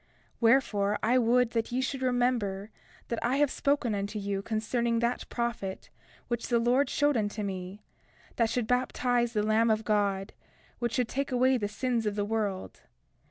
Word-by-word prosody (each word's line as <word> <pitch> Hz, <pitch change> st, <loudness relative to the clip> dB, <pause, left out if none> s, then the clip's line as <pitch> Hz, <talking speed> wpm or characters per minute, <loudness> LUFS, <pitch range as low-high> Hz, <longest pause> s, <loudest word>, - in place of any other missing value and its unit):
31:4 -, -, -37 dB, 0.3 s
Wherefore, 220 Hz, -4 st, +3 dB
I 245 Hz, +4 st, +4 dB
would 245 Hz, 0 st, +3 dB
that 230 Hz, -1 st, -1 dB
ye 250 Hz, -, 0 dB
should 260 Hz, +1 st, -2 dB
remember 245 Hz, -5 st, 0 dB, 0.4 s
that 235 Hz, -, -2 dB
I 245 Hz, +3 st, +1 dB
have 290 Hz, -1 st, +2 dB
spoken 280 Hz, -5 st, 0 dB
unto 200 Hz, +1 st, -3 dB
you 200 Hz, -1 st, -2 dB
concerning 230 Hz, +2 st, -1 dB
that 235 Hz, +1 st, -1 dB
prophet 235 Hz, -5 st, -4 dB, 0.4 s
which 235 Hz, -1 st, -2 dB
the 240 Hz, -, +2 dB
Lord 245 Hz, +4 st, +2 dB
showed 290 Hz, 0 st, +2 dB
unto 210 Hz, -1 st, -1 dB
me, 190 Hz, +1 st, -5 dB, 0.5 s
that 230 Hz, -2 st, +2 dB
should 245 Hz, -1 st, -1 dB
baptize 245 Hz, 0 st, +1 dB
the 210 Hz, -2 st, +1 dB
Lamb 220 Hz, +2 st, +3 dB
of 220 Hz, 0 st, +1 dB
God, 200 Hz, -2 st, 0 dB, 0.5 s
which 235 Hz, -1 st, -1 dB
should 250 Hz, -3 st, +1 dB
take 275 Hz, +2 st, -3 dB
away 255 Hz, +1 st, +3 dB
the 210 Hz, -5 st, -1 dB
sins 230 Hz, +1 st, -1 dB
of 205 Hz, -, -1 dB
the 205 Hz, -1 st, -1 dB
world. 205 Hz, -, -3 dB
230 Hz, 175 wpm, -29 LUFS, 210-250 Hz, 0.5 s, I